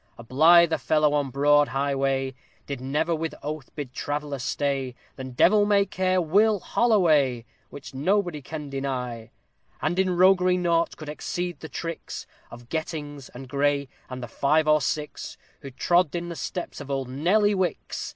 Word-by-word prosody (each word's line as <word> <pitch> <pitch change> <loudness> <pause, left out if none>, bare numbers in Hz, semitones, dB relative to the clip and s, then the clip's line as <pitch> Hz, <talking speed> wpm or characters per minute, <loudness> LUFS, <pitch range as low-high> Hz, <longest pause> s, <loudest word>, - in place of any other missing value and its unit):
_ - - -41
A 115 - -10
blither 160 +6 +5
fellow 150 +3 +2
on 145 -2 0
broad 145 +2 +4
highway, 135 0 -1 0.3
Did 140 -3 -5
never 150 +6 0
with 160 0 -3
oath 150 -2 -5
bid 140 -4 -6
traveller 145 0 -3
stay, 135 -1 -2 0.2
Than 130 -1 -7
devil 205 +11 +5
may 205 -1 +3
care 185 -1 0
WILL 205 +5 +3
HOLLOWAY! 155 - +2 0.2
Which 140 -1 -10
nobody 175 +2 0
can 150 +1 -7
deny. 125 -4 -4 0.5
And 175 +4 -1
in 185 -2 +1
roguery 185 0 +5
naught 170 -2 +1
could 155 - -9
exceed 175 +2 -4
the 160 - -9
tricks 165 -1 -6 0.2
Of 120 0 -12
GETTINGS 145 -2 -5
and 130 +1 -9
GREY, 140 0 0 0.2
and 130 -1 -6
the - - -5
five 150 +6 +1
or 155 0 +4
six 150 +2 -4 0.2
Who 140 - -9
trod 175 +5 +1
in 175 0 -3
the 170 - -5
steps 175 +2 -5
of - - -8
bold 135 -2 -2
NEDDY 185 +11 +2
WICKS! 185 -4 -2
150 Hz, 165 wpm, -25 LUFS, 135-175 Hz, 0.5 s, blither